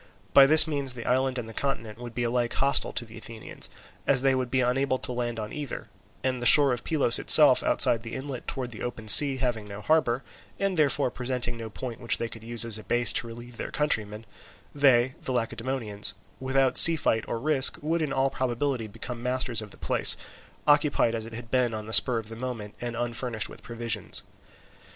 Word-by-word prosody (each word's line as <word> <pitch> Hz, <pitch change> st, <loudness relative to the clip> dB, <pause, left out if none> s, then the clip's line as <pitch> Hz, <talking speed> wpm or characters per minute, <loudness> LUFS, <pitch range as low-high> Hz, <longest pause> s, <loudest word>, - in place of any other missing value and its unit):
By 135 Hz, -1 st, +7 dB
this 155 Hz, +1 st, +6 dB
means 140 Hz, -5 st, -3 dB
the 115 Hz, -, -8 dB
island 130 Hz, +1 st, 0 dB
and 120 Hz, -2 st, -6 dB
the 115 Hz, -, -10 dB
continent 115 Hz, -4 st, -4 dB
would 120 Hz, -2 st, -10 dB
be 120 Hz, -, -2 dB
alike 120 Hz, 0 st, -1 dB
hostile 140 Hz, +1 st, 0 dB
to 120 Hz, -, -2 dB
the 110 Hz, 0 st, -12 dB
Athenians, 110 Hz, 0 st, -5 dB, 0.4 s
as 135 Hz, -2 st, +3 dB
they 135 Hz, -1 st, +3 dB
would 130 Hz, -1 st, -2 dB
be 130 Hz, +1 st, 0 dB
unable 130 Hz, +2 st, 0 dB
to 130 Hz, -, -4 dB
land 120 Hz, -1 st, -4 dB
on 105 Hz, 0 st, -7 dB
either; 145 Hz, -4 st, -7 dB, 0.3 s
and 130 Hz, -1 st, -2 dB
the 120 Hz, -, +2 dB
shore 140 Hz, -1 st, +6 dB
of 120 Hz, -, -6 dB
Pylos 145 Hz, -7 st, 0 dB
itself -, -, +6 dB
outside 115 Hz, -, +3 dB
the 115 Hz, 0 st, -8 dB
inlet 130 Hz, -2 st, -7 dB
towards 125 Hz, -2 st, -5 dB
the 110 Hz, -, -11 dB
open 115 Hz, -3 st, -7 dB
sea 135 Hz, +4 st, +9 dB
having 120 Hz, -5 st, -3 dB
no 100 Hz, 0 st, -9 dB
harbour, 130 Hz, -1 st, 0 dB, 0.3 s
and, 195 Hz, -1 st, -2 dB
therefore, 145 Hz, -4 st, +1 dB
presenting 125 Hz, -1 st, -4 dB
no 115 Hz, -1 st, -8 dB
point 120 Hz, +1 st, -8 dB
which 120 Hz, -2 st, -1 dB
they 115 Hz, -, -4 dB
could 115 Hz, -1 st, -10 dB
use 115 Hz, 0 st, +2 dB
as 110 Hz, -2 st, -3 dB
a -, -, -12 dB
base 120 Hz, -2 st, +1 dB
to 125 Hz, -, 0 dB
relieve 120 Hz, +1 st, -12 dB
their -, -, -6 dB
countrymen, 110 Hz, -7 st, -2 dB, 0.5 s
they, 130 Hz, -3 st, +2 dB
the -, -, -5 dB
Lacedaemonians, 115 Hz, -4 st, -4 dB, 0.2 s
without 130 Hz, 0 st, +2 dB
sea 165 Hz, -, +9 dB
fight 110 Hz, -7 st, -1 dB
or -, -, -4 dB
risk 140 Hz, 0 st, +2 dB
would 165 Hz, +2 st, -1 dB
in 150 Hz, -3 st, -3 dB
all 135 Hz, 0 st, 0 dB
probability 130 Hz, -1 st, -3 dB
become 115 Hz, +3 st, -8 dB
masters 125 Hz, -2 st, -2 dB
of 105 Hz, -, -10 dB
the -, -, -15 dB
place, -, -, +5 dB, 0.5 s
occupied 145 Hz, -5 st, +2 dB
as 115 Hz, -1 st, -5 dB
it 115 Hz, -, -12 dB
had 115 Hz, 0 st, -10 dB
been 125 Hz, -3 st, 0 dB
on 110 Hz, -1 st, -7 dB
the 110 Hz, -, -8 dB
spur 125 Hz, +1 st, +5 dB
of 110 Hz, -1 st, -6 dB
the 115 Hz, -, -9 dB
moment, 115 Hz, -4 st, -7 dB
and 120 Hz, -1 st, -5 dB
unfurnished 120 Hz, -1 st, -3 dB
with -, -, -14 dB
provisions. 115 Hz, -4 st, -3 dB
120 Hz, 210 wpm, -25 LUFS, 115-135 Hz, 0.5 s, sea